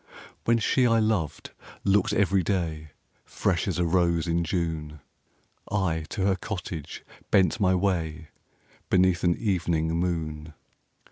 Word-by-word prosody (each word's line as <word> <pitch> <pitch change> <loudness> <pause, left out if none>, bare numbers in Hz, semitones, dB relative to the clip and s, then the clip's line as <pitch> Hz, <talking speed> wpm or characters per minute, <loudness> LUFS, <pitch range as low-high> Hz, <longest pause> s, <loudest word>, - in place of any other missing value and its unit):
When 115 0 +4
she 125 +3 +2
I 115 -1 +3
loved 110 -8 -1 0.3
looked 100 -1 +2
every 100 -1 +2
day 80 -4 -2 0.3
Fresh - - -1
as - - -1
a 90 - +1
rose 85 -1 +2
in 85 0 0
June, 80 -3 -3 0.7
I 85 -6 0
to 100 - -2
her 100 -1 +3
cottage 90 -6 -6 0.2
bent 95 +2 +3
my 95 -2 +3
way, 80 -5 -1 0.6
Beneath 90 -2 +3
an 85 -1 +3
evening 85 -7 0
moon. 80 -3 -2
90 Hz, 130 wpm, -26 LUFS, 80-95 Hz, 0.7 s, When